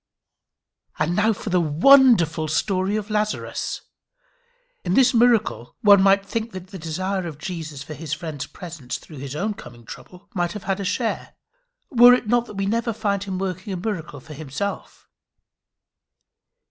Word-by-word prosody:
And 155 Hz, +3 st, 0 dB
now 210 Hz, +3 st, +3 dB
for 210 Hz, -1 st, -5 dB
the 180 Hz, -1 st, +3 dB
wonderful 170 Hz, -, +5 dB
story 190 Hz, +5 st, 0 dB
of 215 Hz, 0 st, -4 dB
Lazarus. 210 Hz, 0 st, -2 dB, 1.0 s
In 180 Hz, 0 st, 0 dB
this 260 Hz, -1 st, +5 dB
miracle 230 Hz, -, +2 dB
one 200 Hz, -2 st, +7 dB
might 195 Hz, 0 st, +4 dB
think 225 Hz, +2 st, -4 dB
the 190 Hz, -, -4 dB
desire 185 Hz, +1 st, -4 dB
of 155 Hz, -4 st, -7 dB
Jesus 155 Hz, -4 st, -6 dB
for 155 Hz, -, -8 dB
his 155 Hz, -1 st, -8 dB
friend's 155 Hz, -3 st, -4 dB
presence 165 Hz, -8 st, -7 dB
through 155 Hz, -, -13 dB
his 135 Hz, +1 st, -6 dB
own 210 Hz, +6 st, -1 dB
coming 120 Hz, -, -13 dB
trouble, 180 Hz, +10 st, -12 dB
might 175 Hz, -2 st, -1 dB
have 210 Hz, -2 st, -7 dB
had 195 Hz, 0 st, -1 dB
a -, -, -3 dB
share, 225 Hz, +4 st, -2 dB, 0.6 s
were 245 Hz, -1 st, +8 dB
it 250 Hz, -, -4 dB
not 240 Hz, +1 st, +2 dB
that -, -, -10 dB
we 195 Hz, 0 st, -1 dB
never 230 Hz, +3 st, 0 dB
find 200 Hz, -2 st, -1 dB
him 190 Hz, -2 st, -4 dB
working 190 Hz, +1 st, -4 dB
a -, -, -3 dB
miracle 175 Hz, -7 st, -4 dB
for 155 Hz, +4 st, -12 dB
himself. 155 Hz, +7 st, -6 dB
190 Hz, 160 wpm, -23 LUFS, 160-210 Hz, 1.0 s, were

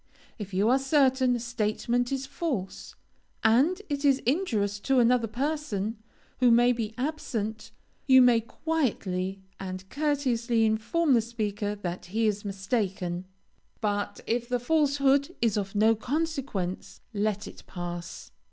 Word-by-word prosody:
If 200 Hz, -2 st, -6 dB
you 195 Hz, +3 st, +2 dB
are 260 Hz, +2 st, +4 dB
certain 265 Hz, -2 st, +3 dB
a -, -, -2 dB
statement 235 Hz, +1 st, -1 dB
is 270 Hz, 0 st, -2 dB
false, 265 Hz, -, -4 dB, 0.5 s
and 270 Hz, -, +4 dB
it 285 Hz, -1 st, -3 dB
is 275 Hz, -2 st, +5 dB
injurious 225 Hz, -, 0 dB
to 270 Hz, +5 st, +1 dB
another 240 Hz, -1 st, +4 dB
person, 235 Hz, -4 st, -2 dB, 0.4 s
who 250 Hz, -1 st, +5 dB
may 240 Hz, +1 st, +5 dB
be 225 Hz, -3 st, -3 dB
absent, 240 Hz, -6 st, -3 dB, 0.4 s
you 260 Hz, -1 st, +8 dB
may 245 Hz, -2 st, +6 dB
quietly 210 Hz, -, -2 dB, 0.2 s
and 185 Hz, 0 st, -6 dB
courteously 255 Hz, -6 st, +1 dB
inform 230 Hz, +9 st, +1 dB
the 235 Hz, -, +5 dB
speaker 210 Hz, -2 st, -3 dB
that 180 Hz, -4 st, -5 dB
he 220 Hz, +5 st, -1 dB
is 210 Hz, -1 st, 0 dB
mistaken, 190 Hz, -3 st, -2 dB, 0.5 s
but 205 Hz, -1 st, -2 dB
if 240 Hz, +1 st, -1 dB
the 250 Hz, 0 st, +1 dB
falsehood 280 Hz, +2 st, +2 dB
is 230 Hz, -3 st, +2 dB
of 200 Hz, -1 st, -3 dB
no 220 Hz, +2 st, +5 dB
consequence, 265 Hz, -, -3 dB
let 210 Hz, 0 st, -1 dB
it -, -, -11 dB
pass. 175 Hz, -1 st, -7 dB
230 Hz, 135 wpm, -28 LUFS, 205-270 Hz, 0.5 s, you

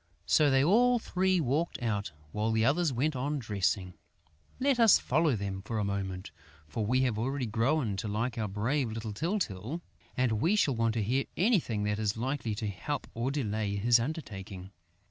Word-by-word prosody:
So 150 Hz, -2 st, +4 dB
they 135 Hz, 0 st, +4 dB
all 245 Hz, +9 st, +4 dB
three 185 Hz, -4 st, +1 dB
walked 155 Hz, +4 st, 0 dB
out, 105 Hz, -7 st, -2 dB, 0.2 s
while 105 Hz, +1 st, -1 dB
the 110 Hz, 0 st, +2 dB
others 155 Hz, +4 st, +2 dB
went 135 Hz, +4 st, 0 dB
on 145 Hz, +4 st, -1 dB
dressing. 100 Hz, -5 st, -1 dB, 0.7 s
Let 270 Hz, -1 st, +2 dB
us 225 Hz, -4 st, +7 dB
follow 150 Hz, 0 st, +1 dB
them 100 Hz, -2 st, -4 dB
for 110 Hz, +3 st, -4 dB
a 105 Hz, -, 0 dB
moment, 95 Hz, -4 st, -3 dB, 0.4 s
for 110 Hz, +8 st, -3 dB
we 125 Hz, +5 st, +2 dB
have 120 Hz, -5 st, 0 dB
already 130 Hz, +3 st, -1 dB
grown 115 Hz, 0 st, 0 dB
to 105 Hz, -, -3 dB
like 115 Hz, +4 st, -1 dB
our 110 Hz, -2 st, -2 dB
brave 115 Hz, +6 st, -1 dB
little 110 Hz, -1 st, -5 dB
Tyltyl 155 Hz, -, -2 dB, 0.4 s
and 115 Hz, -4 st, +1 dB
we 175 Hz, +8 st, +3 dB
shall 145 Hz, -11 st, +2 dB
want 115 Hz, 0 st, +1 dB
to 110 Hz, -, 0 dB
hear 130 Hz, +6 st, 0 dB
anything 170 Hz, -, +2 dB
that 105 Hz, 0 st, -1 dB
is 105 Hz, 0 st, -1 dB
likely 125 Hz, -2 st, -2 dB
to 105 Hz, +1 st, -3 dB
help 105 Hz, +9 st, -4 dB
or 120 Hz, +3 st, -1 dB
delay 110 Hz, -7 st, -1 dB
his 115 Hz, +4 st, +4 dB
undertaking. 105 Hz, -, -6 dB
115 Hz, 185 wpm, -30 LUFS, 105-145 Hz, 0.7 s, us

